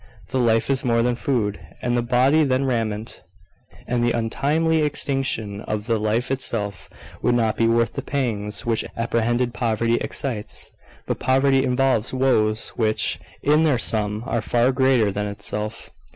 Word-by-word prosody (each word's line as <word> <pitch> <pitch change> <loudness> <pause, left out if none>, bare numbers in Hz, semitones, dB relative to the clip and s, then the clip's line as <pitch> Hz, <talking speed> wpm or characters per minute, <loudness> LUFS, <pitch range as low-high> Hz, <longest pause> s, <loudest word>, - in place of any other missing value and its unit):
"The 130 - 0
life 115 +1 +2
is 135 -1 +1
more 115 -2 +2
than 125 0 +1
food, 115 -5 -1 0.2
and 120 0 -1
the 120 - +2
body 130 +6 +3
than 135 -1 +1
raiment;" 115 -4 -2 0.6
and 120 -1 -1
the 120 - +2
untimely 150 +8 +1
extinction 135 -8 -1
of 105 -1 -4
the 115 -2 0
life 110 +4 0
itself 110 -6 -3 0.3
would 120 - +2
not 110 -2 +1
be 115 - +2
worth 115 0 +2
the - - -3
pangs 115 -6 -2
which 115 -2 +1
apprehended 120 +1 0
poverty 115 0 +1
excites. 115 -6 -4 0.3
But - - -3
poverty 135 +1 +3
involves 130 -2 +1
woes 110 -5 +1
which, 110 -7 0 0.2
in 150 +2 +4
their 150 -5 +3
sum, 105 -1 0
are 120 -3 -1
far 120 +3 +2
greater 130 -5 +3
than 105 +1 -2
itself. 105 +2 -5
120 Hz, 155 wpm, -22 LUFS, 110-130 Hz, 0.6 s, in